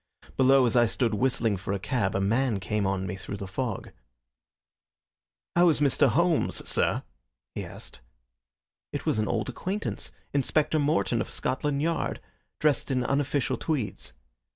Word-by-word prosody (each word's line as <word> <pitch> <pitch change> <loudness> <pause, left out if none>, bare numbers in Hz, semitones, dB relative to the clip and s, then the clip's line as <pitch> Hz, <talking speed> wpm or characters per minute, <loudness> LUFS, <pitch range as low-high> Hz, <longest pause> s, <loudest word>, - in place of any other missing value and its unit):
Below, 135 0 +5
as 120 - +1
I 120 -1 +5
stood 115 0 0
whistling 115 -2 +1
for 90 +2 -3
a - - 0
cab, 110 -2 -1
a - - +2
man 115 +2 +1
came 105 +1 -1
on 95 -1 -1
me 95 0 -3
through 100 +1 -6
the 100 -1 -6
fog. 110 +2 -3 1.6
"How 175 0 +6
is 155 - +2
Mr. 145 0 +4
Holmes, 170 +6 +1
sir?" - - +1 0.5
he - - -4
asked. - - -10 0.9
It - - -4
was - - +1
an 105 - 0
old 115 -1 -1
acquaintance, 190 - -3 0.2
Inspector 150 +3 +2
Morton, 145 -9 +1
of - - -4
Scotland 140 +2 -1
Yard, 165 +1 -1 0.4
dressed 150 -1 +1
in 130 -2 +1
unofficial 140 0 0
tweeds. 130 - -3
130 Hz, 155 wpm, -27 LUFS, 105-145 Hz, 1.6 s, How